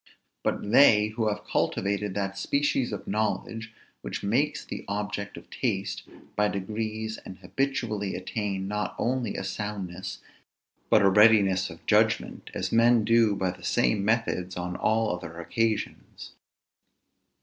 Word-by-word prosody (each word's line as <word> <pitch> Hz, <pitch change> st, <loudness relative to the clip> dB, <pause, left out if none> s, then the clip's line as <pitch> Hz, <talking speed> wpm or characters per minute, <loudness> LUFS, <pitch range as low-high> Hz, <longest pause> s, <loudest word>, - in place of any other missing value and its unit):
But -, -, -1 dB
they 110 Hz, -5 st, +6 dB
who 110 Hz, 0 st, -1 dB
have 105 Hz, -, -2 dB
cultivated 100 Hz, 0 st, -1 dB
that 100 Hz, -1 st, -2 dB
species 140 Hz, +3 st, 0 dB
of 105 Hz, -, -5 dB
knowledge 110 Hz, +1 st, -2 dB, 0.3 s
which -, -, -5 dB
makes 145 Hz, +9 st, 0 dB
the -, -, -6 dB
object 100 Hz, 0 st, -3 dB
of -, -, -11 dB
taste, 100 Hz, -7 st, -2 dB, 0.3 s
by 105 Hz, 0 st, +3 dB
degrees 110 Hz, +2 st, -3 dB
and 95 Hz, -, -10 dB
habitually 105 Hz, -2 st, -2 dB
attain 95 Hz, 0 st, -3 dB
not 105 Hz, +1 st, -2 dB
only 125 Hz, -2 st, -1 dB
a -, -, -3 dB
soundness 95 Hz, -2 st, -5 dB, 0.7 s
but 110 Hz, -, +5 dB
a 100 Hz, -, +6 dB
readiness 100 Hz, -3 st, +5 dB
of -, -, -12 dB
judgment, -, -, +1 dB
as -, -, -2 dB
men 115 Hz, -1 st, +5 dB
do 115 Hz, -2 st, +4 dB
by 95 Hz, -2 st, 0 dB
the 90 Hz, -, -14 dB
same 60 Hz, +10 st, +2 dB
methods 100 Hz, -5 st, 0 dB
on 90 Hz, 0 st, -3 dB
all 110 Hz, -2 st, +1 dB
other 85 Hz, -1 st, -8 dB
occasions. 110 Hz, +6 st, -2 dB
105 Hz, 140 wpm, -27 LUFS, 95-115 Hz, 0.7 s, they